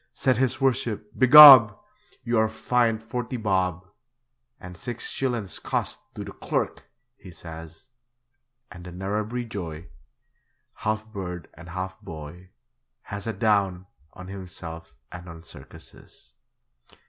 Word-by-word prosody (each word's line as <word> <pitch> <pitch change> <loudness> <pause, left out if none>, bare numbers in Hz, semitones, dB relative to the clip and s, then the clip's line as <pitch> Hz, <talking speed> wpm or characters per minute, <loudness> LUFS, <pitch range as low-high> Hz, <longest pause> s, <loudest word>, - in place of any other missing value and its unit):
Said 130 -3 +1
his 130 -1 0
worship, 120 -6 -1
'Begob! 130 -5 +10 0.5
You 120 -1 0
are 110 0 +2
fined 115 0 0
forty 125 +2 -5
bob, 95 -4 -1 0.7
And 90 0 -11
six 120 +6 -5
shillin's 120 -9 -3
costs - - -3
to - - -6
the - - -9
clurk!' - - -3 0.3
he 95 - -14
says. 80 +7 -12 0.8
And 90 -1 -11
the 90 - -10
Narrabri 105 +6 -4
joy, 85 -6 -7 0.8
Half 110 0 -3
bird 90 -4 -7
and 85 +1 -13
half 95 +1 -6
boy, 85 +2 -10 0.5
Has 100 +1 -7
a 115 - -2
'down' 100 -3 0 0.3
on 95 - -11
himself 85 -5 -9 0.2
and 90 0 -10
on 80 -1 -11
circuses. 65 -4 -15
95 Hz, 125 wpm, -25 LUFS, 90-115 Hz, 0.8 s, Begob